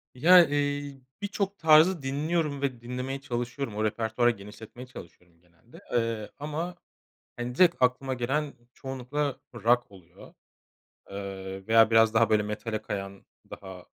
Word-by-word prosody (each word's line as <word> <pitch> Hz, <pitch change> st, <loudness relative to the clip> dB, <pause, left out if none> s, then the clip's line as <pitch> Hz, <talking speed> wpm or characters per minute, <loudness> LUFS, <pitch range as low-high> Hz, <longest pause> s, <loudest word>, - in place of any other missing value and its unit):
Ya, 175 Hz, +6 st, +7 dB
eee, 145 Hz, -1 st, -2 dB, 0.2 s
birçok 200 Hz, -1 st, -2 dB
tarzı 160 Hz, +2 st, +5 dB
dinliyorum 145 Hz, +2 st, -1 dB
ve 130 Hz, -4 st, -2 dB
dinlemeye 125 Hz, +3 st, -5 dB
çalışıyorum. 120 Hz, -1 st, -4 dB
O 110 Hz, -, -1 dB
repertuvarı 110 Hz, +2 st, +1 dB
genişletmeye 110 Hz, +4 st, -11 dB
çalışıyorum 90 Hz, -6 st, -14 dB
genelde, 90 Hz, +7 st, -19 dB
eee, 115 Hz, -3 st, -1 dB
ama, 155 Hz, +4 st, -4 dB, 0.6 s
hani, 120 Hz, 0 st, -5 dB
direkt 175 Hz, -2 st, +5 dB
aklıma 130 Hz, +1 st, +1 dB
gelen 135 Hz, +4 st, -1 dB, 0.2 s
çoğunlukla 135 Hz, +2 st, -4 dB
rock 120 Hz, 0 st, +1 dB
oluyor, 90 Hz, -3 st, -16 dB, 0.8 s
eee, 95 Hz, -1 st, -7 dB
veya 115 Hz, 0 st, +5 dB
biraz 115 Hz, -1 st, +5 dB
daha 115 Hz, 0 st, +4 dB
böyle 105 Hz, -1 st, +3 dB
metale 110 Hz, +1 st, -4 dB
kayan 100 Hz, -2 st, -6 dB, 0.2 s
daha 95 Hz, -2 st, -10 dB
120 Hz, 130 wpm, -27 LUFS, 110-145 Hz, 0.8 s, Ya